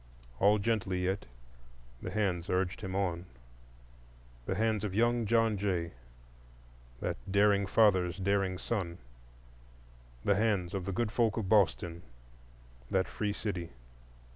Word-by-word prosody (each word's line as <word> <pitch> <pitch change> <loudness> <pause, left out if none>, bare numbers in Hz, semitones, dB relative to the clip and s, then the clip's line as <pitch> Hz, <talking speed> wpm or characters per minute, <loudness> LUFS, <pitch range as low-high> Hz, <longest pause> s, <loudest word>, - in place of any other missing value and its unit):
All 105 +2 +5
gently 100 -4 0
yet, 95 +2 -1 0.7
the - - -4
hands 90 -4 -1
urged 90 +4 0
him 95 -2 -4
on,—the - - -7
hands 110 0 +1
of 100 -3 -3
young 120 0 +2
John 115 -1 +3
Jay, 90 -4 -1 1.1
that - - -2
daring 100 0 +4
father's 95 -6 +3
daring 95 -1 0
son; 90 -5 -3 1.3
the 100 - +4
hands 100 -3 +1
of 95 -2 -3
the 100 - -2
good 105 +3 -1
folk 115 -2 +1
of 105 -5 -2
Boston, 85 -5 +2 0.9
that 95 -1 +1
free 105 -1 -2
city. 95 - -4
95 Hz, 120 wpm, -31 LUFS, 85-105 Hz, 1.3 s, All